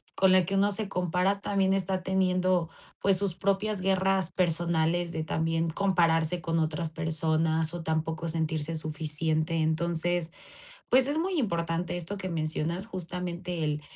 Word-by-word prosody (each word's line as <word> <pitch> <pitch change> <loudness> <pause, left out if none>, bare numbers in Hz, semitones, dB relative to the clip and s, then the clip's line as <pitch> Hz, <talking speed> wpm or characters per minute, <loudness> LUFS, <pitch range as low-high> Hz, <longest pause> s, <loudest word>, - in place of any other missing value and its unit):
con 190 -1 +4
la 185 -1 +5
que 195 +3 -1
uno 200 +1 +3
se 205 +1 -1
compara 180 +2 0
también 195 -1 +1
está 190 -1 -1
teniendo, 185 -2 +1 0.3
pues, 195 -1 +4
sus 195 -2 -1
propias 200 +1 0
guerras 190 -1 +1
personales 170 -1 +1
de 160 -1 -3
también 165 +1 0
compararse 170 -2 +2
con 165 +1 0
otras 160 +1 -1
personas 160 0 0
o 175 - -4
tampoco 160 +1 -2
sentirse 160 -1 -1
suficiente. 155 +1 -1
Entonces, 165 +1 0 0.6
pues 260 +1 +5
es 290 +2 0
muy 355 +1 0
importante 170 -5 -1
esto 175 +4 -5
que 190 -1 -4
mencionas, 165 +2 -2
justamente 180 -2 -4
el 150 0 -1
170 Hz, 145 wpm, -28 LUFS, 160-190 Hz, 0.6 s, la